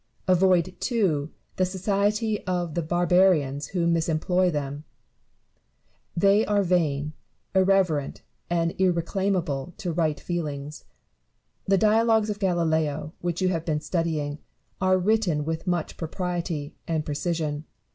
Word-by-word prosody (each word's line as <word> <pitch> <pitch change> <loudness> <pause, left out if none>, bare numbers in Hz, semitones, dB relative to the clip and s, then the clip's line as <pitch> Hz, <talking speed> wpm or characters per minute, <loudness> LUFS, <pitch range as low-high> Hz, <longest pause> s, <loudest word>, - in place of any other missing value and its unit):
Avoid, 185 -1 +3
too, 170 - 0 0.3
the 185 - +3
society 205 +3 0
of 175 -3 -1
the 170 - 0
barbarians 175 -4 +2
who 175 -2 -1
misemploy 170 +2 +2
them: 145 -1 -4 1.3
they 200 +4 +5
are 205 -1 +2
vain, 155 -5 0 0.4
irreverent, 190 -6 +2 0.3
and 170 -1 +1
irreclaimable 175 -4 0
to 190 -5 -3
right 155 -3 0
feel 175 -3 -2
ings. 145 +1 -7 0.8
The 195 0 +4
dialogues 220 +1 +3
of 205 - -5
Galileo, 160 -5 0
which 175 +1 -2
you 185 - +3
have 165 -3 -1
been 155 -3 -1
studying, 155 -3 -2 0.4
are 185 0 +4
written 185 -6 +1
with 160 +3 -3
much 175 -3 -1
propriety 170 -3 -3
and 160 -2 -1
precision. 150 0 -2
175 Hz, 120 wpm, -25 LUFS, 155-190 Hz, 1.3 s, they